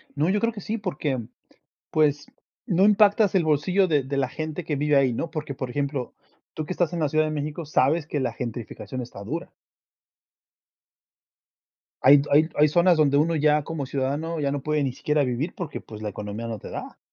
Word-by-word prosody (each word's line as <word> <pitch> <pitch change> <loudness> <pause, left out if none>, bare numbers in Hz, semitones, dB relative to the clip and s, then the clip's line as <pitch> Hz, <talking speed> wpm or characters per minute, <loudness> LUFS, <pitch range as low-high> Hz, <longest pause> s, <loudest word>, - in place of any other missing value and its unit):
No, 150 +4 +1
yo 205 +2 +2
creo 230 +2 +1
que 210 - -8
sí, 215 +4 -3
porque, 155 -9 -2 0.7
pues, 150 -2 +2 0.4
no 185 -3 +3
impactas 210 0 +4
el 185 - +4
bolsillo 180 +6 +2
de 145 -5 +2
de 140 +1 -3
la 135 -2 +1
gente 155 +4 -5
que 150 -2 -2
vive 145 +1 +2
ahí, 135 -3 +4
¿no? 160 +8 -3
Porque, 150 -4 -5
por 130 -1 -5
ejemplo, 140 -1 -3 0.4
tú 155 -1 -4
que 185 - -3
estás 175 -1 0
en 170 - -2
la 155 - +2
Ciudad 155 +2 +2
de 155 - -2
México, 150 +2 -4
sabes 150 +2 +2
que 145 - -2
la 125 -3 -1
gentrificación 120 +2 -6
está 115 -4 -9
dura. 160 +10 -5 2.5
Hay 140 +2 +8
hay 155 +3 +5
hay 150 - +6
zonas 175 +3 +4
donde 145 -2 +3
uno 160 +2 +2
ya 150 0 +3
como 145 -3 -4
ciudadano, 145 +5 -2
ya 140 -1 0
no 140 0 -2
puede 150 +1 0
ni 135 -3 -1
siquiera 150 +2 0
vivir 130 +6 -2
porque, 165 -5 -5
pues, 110 -1 -11
la 105 - -2
economía 105 +3 -6
no 110 - -4
te - - -10
da. - - -7
150 Hz, 205 wpm, -25 LUFS, 135-165 Hz, 2.5 s, Hay